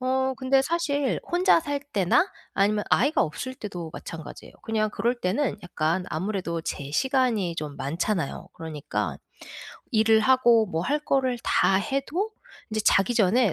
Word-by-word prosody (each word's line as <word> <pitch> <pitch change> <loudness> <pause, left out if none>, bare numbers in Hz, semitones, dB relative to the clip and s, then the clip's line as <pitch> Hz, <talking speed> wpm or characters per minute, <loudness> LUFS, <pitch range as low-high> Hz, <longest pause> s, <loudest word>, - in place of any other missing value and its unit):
어 260 +1 +1
근데 270 0 +3
사실 290 -4 0
혼자 355 -1 +4
살 285 -2 -3
때나 195 - +3 0.3
아니면 205 +1 +2
아이가 285 +5 +3
없을 255 +12 -4
때도 180 - -6
마찬가지예요. 165 -2 -9
그냥 215 -1 0
그럴 230 +4 0
때는 210 +5 0
약간 175 +1 -1
아무래도 170 -1 -3
제 140 -3 -5
시간이 230 - +1
좀 150 -2 -5
많잖아요. 165 +3 -2
그러니까 160 -4 -4 0.8
일을 220 0 +4
하고 240 -2 +4
뭐 165 -4 -2
할 290 +10 +1
거를 260 -4 0
다 190 - +3
해도 295 - -1 0.4
이제 215 0 -1
자기 195 +5 +3
전에 220 0 +3
220 Hz, 300 characters per minute, -26 LUFS, 180-265 Hz, 0.8 s, 혼자